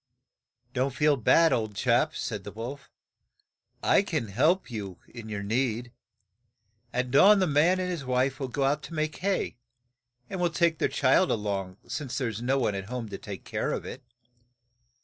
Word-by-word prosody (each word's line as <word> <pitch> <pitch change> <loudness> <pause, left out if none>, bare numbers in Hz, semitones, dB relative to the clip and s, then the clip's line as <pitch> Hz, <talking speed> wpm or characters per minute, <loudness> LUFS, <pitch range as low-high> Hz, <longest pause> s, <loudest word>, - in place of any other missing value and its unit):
"Don't 130 +1 0
feel 150 -1 +4
bad, 165 +7 +4
old 110 -3 -1
chap," 125 +7 +2
said 105 -4 -4
the 100 - -7
wolf. 125 +6 -7 0.9
"I - - +5
can 150 - -2
help 150 - +2
you 100 -5 -5
in 115 -2 -10
your 100 -1 -4
need. 120 +2 -1 1.0
At 125 0 -1
dawn 200 +10 +7
the 190 - +3
man 165 +4 +3
and 185 - -1
his 170 -5 -4
wife 130 +2 0
will 135 - -2
go 135 +2 -2
out 145 +2 +1
to 165 - -8
make 155 0 -1
hay, 190 -10 -1 0.7
and 185 +4 -4
will 175 - +3
take 170 -1 +1
their - - +2
child 140 +7 +3
a - - +3
long, 100 -3 -3
as 120 +2 -4
there 130 -4 0
is 110 0 -6
no 130 +3 +1
one 115 -6 +1
at 95 -1 -4
home 120 0 -5
to 100 - -6
take 100 -3 -8
care - - -2
of - - -3
it. - - -7
130 Hz, 190 wpm, -28 LUFS, 110-155 Hz, 1.0 s, dawn